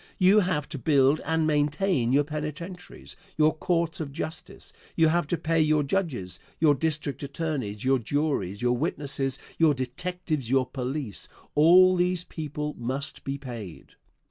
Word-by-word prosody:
You 190 +3 +6
have 180 -7 0
to 150 -3 -6
build 140 +2 +3
and 160 0 +1
maintain 150 -2 +1
your 140 +2 +4
penitentiaries, 155 +4 -7 0.2
your 155 0 +4
courts 170 +1 0
of 150 -4 -4
justice; 170 +5 -6 0.2
you 160 -1 +4
have 170 -2 +1
to 175 - -1
pay 165 0 +1
your 155 -1 +3
judges, 140 - -2 0.2
your 155 -2 +5
district 150 -1 -1
attorneys, 140 -8 -3
your 135 0 +3
juries, 120 - -1
you 120 - +3
witnesses, 135 0 -1 0.2
your 160 -3 +5
detectives, 150 +1 -3
your 130 0 +3
police 130 -3 -4 0.2
all 180 +4 +7
these 180 0 +1
people 150 -3 -5
must 130 +4 -3
be 135 0 -3
paid. 115 - -8
150 Hz, 145 wpm, -27 LUFS, 135-165 Hz, 0.2 s, all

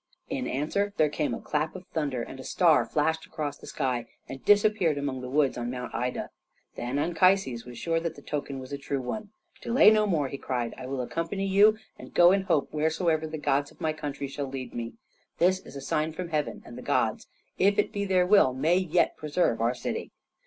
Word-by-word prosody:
In - - -2
answer 200 +9 -1
there 155 - +4
came 150 0 -1
a - - -7
clap 155 +3 -2
of 185 0 -9
thunder 140 -6 -1
and 135 - -9
a - - -7
star 170 -4 +3
flashed 160 +1 0
across 150 -3 -4
the - - -12
sky 125 -5 -2 0.2
and 135 - -8
disappeared 205 -6 +4
among 140 -2 -3
the 125 - -6
woods 140 -2 +2
on 120 0 -3
Mount 125 0 -5
Ida. 125 +2 -3 0.4
Then 125 +3 -3
Anchises 165 -6 +2
was 120 -1 -9
sure 165 +3 0
that 165 -1 -4
the 145 - -13
token 145 -2 -4
was 130 +1 -8
a 140 - -3
true 140 0 -2
one. 205 - -5 0.3
"Delay 235 -2 +6
no 215 -1 +3
more!" 155 -8 +1
he 135 +1 -6
cried. 120 -2 -2
"I 130 - -8
will 135 -1 -2
accompany 165 +9 -3
you, 205 +3 +5 0.2
and - - -12
go 175 0 +7
in 195 0 +3
hope 165 -7 +1
wheresoever 160 +1 +1
the 155 0 -5
gods 145 -1 0
of - - -21
my 155 -1 0
country 145 -2 -5
shall 140 +1 -4
lead 130 -1 -6
me. 115 -1 -5 0.4
This 185 +2 +3
is - - -13
a 140 - -6
sign 155 +3 -1
from 175 +1 -5
heaven, 150 -2 -2
and - - -9
the - - -8
gods, - - 0 0.3
if 200 +2 +4
it - - +1
be 200 - -1
their 185 -2 +3
will, 180 -10 +5
may 160 +7 +3
yet 180 -2 +1
preserve 150 -6 0
our 120 +2 +1
city." - - -4
150 Hz, 220 wpm, -28 LUFS, 135-180 Hz, 0.4 s, go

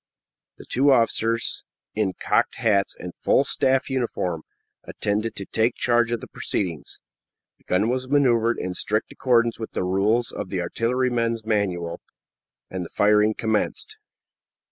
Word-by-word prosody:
The - - -12
two 140 +2 +3
officers, 115 -2 +1 0.3
in 105 -3 0
cocked - - 0
hats 100 -3 +1
and 90 -1 -7
full - - +2
staff 130 0 +1
uniform, 115 - -2 0.4
attended 105 +2 -2
to 100 - -6
take 110 +4 +1
charge 120 -1 +2
of 120 - -1
the - - -8
proceedings. 85 -6 -4 0.6
The - - -29
gun 100 +4 +1
was 130 +1 -2
maneuvered 120 -5 +3
in 90 0 -3
strict 105 +4 -1
accordance 120 -3 +2
with 110 - -6
the - - -1
rules 100 +5 +1
of 95 - -6
"The 95 - -2
Artilleryman's 115 +2 0
Manual," 90 -6 -1 0.7
and 95 -1 -4
the 85 - -8
firing 105 +1 +3
commenced. 115 - -1
110 Hz, 145 wpm, -24 LUFS, 100-120 Hz, 0.7 s, two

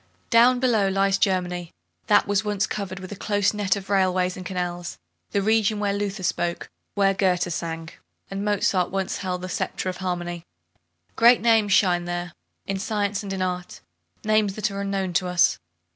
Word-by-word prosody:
Down 245 +2 +6
below 230 -6 +2
lies 195 0 +2
Germany, 180 -3 0 0.4
that 205 - +5
was 205 +1 +1
once 210 -1 0
covered 195 -4 -5
with 185 0 -9
a - - -5
close 205 +1 +1
net 205 -2 +1
of 195 -1 -7
railway 185 -2 +2
and 185 - -7
canals, 175 -1 -4 0.3
the 200 - 0
region 215 0 +2
where 205 -1 0
Luther 200 -1 -3
spoke, 175 -1 -2 0.2
where 195 -1 +3
Goethe 180 -3 +1
sang, 165 0 -4 0.4
and 195 +1 -3
Mozart 195 -3 +1
once 195 0 -2
held 180 -1 -4
the - - -3
sceptre 185 - -2
of 185 - -5
harmony. 175 -2 -3 0.7
Great 235 +1 +6
names 225 -4 +3
shine 175 -3 +3
there, 175 0 -4 0.3
in 195 -1 -2
science 205 0 -1
and 200 -2 -6
in 190 -1 -1
art, 180 -1 -4 0.4
names 215 -2 +2
that 215 -1 -1
are 200 0 -4
unknown 195 -2 -2
to 180 +2 +1
us. 180 -1 +3
195 Hz, 175 wpm, -24 LUFS, 180-205 Hz, 0.7 s, Down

